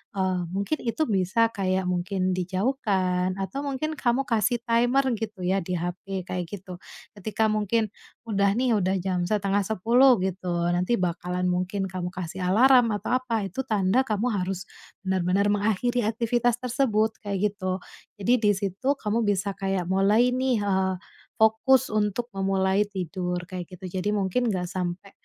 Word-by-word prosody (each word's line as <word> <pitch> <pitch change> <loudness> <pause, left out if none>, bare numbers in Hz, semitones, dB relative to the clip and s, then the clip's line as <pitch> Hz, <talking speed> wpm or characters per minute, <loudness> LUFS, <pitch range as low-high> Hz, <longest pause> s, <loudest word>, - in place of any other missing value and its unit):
eee, 185 -1 0 0.2
mungkin 200 +10 -1
itu 240 +6 -1
bisa 225 - +2
kayak 190 -2 0
mungkin 185 +1 -1
dijauhkan 185 -1 0
atau 195 +8 -4
mungkin 280 +3 -2
kamu 245 +2 +2
kasih 235 -1 +1
timer 240 +4 +3 0.2
gitu 215 -4 -5
ya 190 +2 +2
di 180 0 -3
HP, 180 +2 -4
kayak 180 -1 -3
gitu, 185 -1 -8 0.4
ketika 215 +2 0
mungkin 215 0 0 0.3
udah 200 -3 +1
nih 250 +1 +1
udah 190 0 +1
jam 180 -2 -1
9.30 215 +5 +3
gitu, 190 -1 -3 0.2
nanti 180 +6 +1
bakalan 180 -1 -2
mungkin 185 +2 -1
kamu 180 -1 -3
kasih 185 0 -6
alarm 245 +4 +5
atau 250 +4 0
apa, 230 -4 -2
itu 195 +8 -4
tanda 205 +2 +2
kamu 220 +3 0
harus 190 -2 -2 0.4
bener-bener 190 +2 +1
mengakhiri 220 +4 +1
aktivitas 235 +1 +1
tersebut, 225 -4 0
kayak 205 0 -1
gitu, 185 -2 -2 0.4
jadi 230 +5 +2
di 210 -2 +4
situ 200 +9 -1
kamu 225 -2 -1
bisa 200 0 +1
kayak 195 -2 -1
mulai 210 +6 +4
nih, 255 -4 +1
eee, 190 -1 +1 0.4
fokus 220 +4 +3
untuk 215 +3 -1
memulai 195 +1 +1
tidur, 180 -2 -3
kayak 180 -1 -7
gitu, 180 0 -8
jadi 195 +3 -1
mungkin 205 +5 0
nggak 185 -5 -1
sampe, 185 +2 -4
200 Hz, 150 wpm, -26 LUFS, 185-230 Hz, 0.4 s, alarm